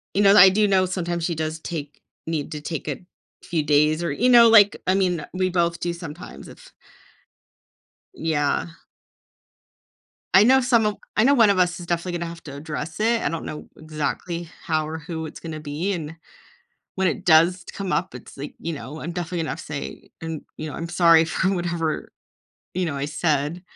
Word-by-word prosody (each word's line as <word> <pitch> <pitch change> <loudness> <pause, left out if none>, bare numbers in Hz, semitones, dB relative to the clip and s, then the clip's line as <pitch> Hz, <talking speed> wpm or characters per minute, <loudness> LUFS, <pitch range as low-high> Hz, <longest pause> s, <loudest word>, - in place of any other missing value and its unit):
You 205 - +3
know 200 0 +7
that 210 - +8
I 190 - +10
do 210 +2 +3
know 190 -1 +3
sometimes 175 -2 -3
she 170 - -1
does 155 0 -3
take 150 -3 -7 0.3
need 160 -1 -3
to 150 - -5
take 155 0 -5
a 150 - -3 0.4
few 160 -4 -2
days 150 +2 +3
or 170 - -1
you 245 - +1
know, 235 -2 +8
like, 210 -3 +6
I 185 - +3
mean, 180 -5 0
we 185 0 0
both 170 -1 0
do 175 - -1
sometimes 170 -1 -9
if - - -15 1.4
Yeah. 155 - 0 1.7
I 190 - +9
know 265 +4 +6
some 240 -3 +3
of 210 -1 0 0.2
I 215 - +4
know 280 +2 +5
one 225 -5 +5
of 195 - +2
us 180 0 +1
is 170 - -8
definitely 175 0 -2
gonna 170 - -4
have 170 0 -10
to 140 -2 -8
address 155 +3 -6
it. 230 +1 +2
I - - +1
don't 165 - -4
know 150 - -7
exactly 160 +2 -4
how 155 -3 0
or 160 +1 -5
who 160 0 -6
it's 155 - -9
gonna 160 -2 -6
be, 155 +6 -3
and 165 -3 -5 0.8
when 190 -1 +1
it 185 +3 -3
does 175 +1 +4
come 195 -2 -4
up, 185 - -1
it's, - - -11
like, 145 +1 -7
you 170 - -4
know, 150 +1 -8
I'm 170 - -5
definitely 175 0 -4
gonna 160 - -2
have 160 - -5
say, 150 -2 -7
and, 160 -2 -5
you 155 - -5
know, - - -7
"I'm 165 0 -5
sorry 170 -2 +5
for 185 +3 0
whatever, 170 -3 -2 0.6
you 180 0 0
know, 150 -4 -3
I 140 - -2
said" 150 +2 -1
170 Hz, 200 wpm, -23 LUFS, 155-185 Hz, 1.7 s, I